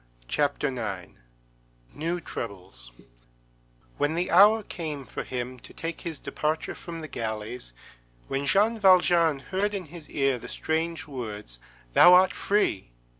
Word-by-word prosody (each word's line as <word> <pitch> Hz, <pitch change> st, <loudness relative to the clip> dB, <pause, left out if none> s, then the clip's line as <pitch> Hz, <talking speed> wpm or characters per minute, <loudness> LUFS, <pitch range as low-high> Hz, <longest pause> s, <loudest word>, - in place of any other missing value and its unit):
CHAPTER 145 Hz, -, 0 dB
IX—NEW -, -, -7 dB
TROUBLES 90 Hz, -, -7 dB, 1.1 s
When 150 Hz, +2 st, +1 dB
the 175 Hz, +2 st, -1 dB
hour 210 Hz, +5 st, +7 dB
came 155 Hz, -7 st, -5 dB
for -, -, -5 dB
him 125 Hz, 0 st, -5 dB
to -, -, -13 dB
take 165 Hz, 0 st, -5 dB
his 165 Hz, -3 st, -5 dB
departure 155 Hz, +1 st, -2 dB
from 165 Hz, -1 st, -8 dB
the 155 Hz, -, -6 dB
galleys, 110 Hz, -, -5 dB, 0.6 s
when 140 Hz, +1 st, -2 dB
Jean 215 Hz, +7 st, +3 dB
Valjean 175 Hz, -5 st, +5 dB
heard 195 Hz, +8 st, -2 dB
in 190 Hz, -3 st, -4 dB
his 165 Hz, -4 st, -10 dB
ear 135 Hz, -3 st, +1 dB
the -, -, -9 dB
strange 160 Hz, +1 st, -2 dB
words, 105 Hz, -, -7 dB, 0.3 s
_Thou 175 Hz, -, +8 dB
art 185 Hz, +1 st, +6 dB
free! 195 Hz, -, 0 dB
145 Hz, 130 wpm, -27 LUFS, 110-175 Hz, 1.1 s, Thou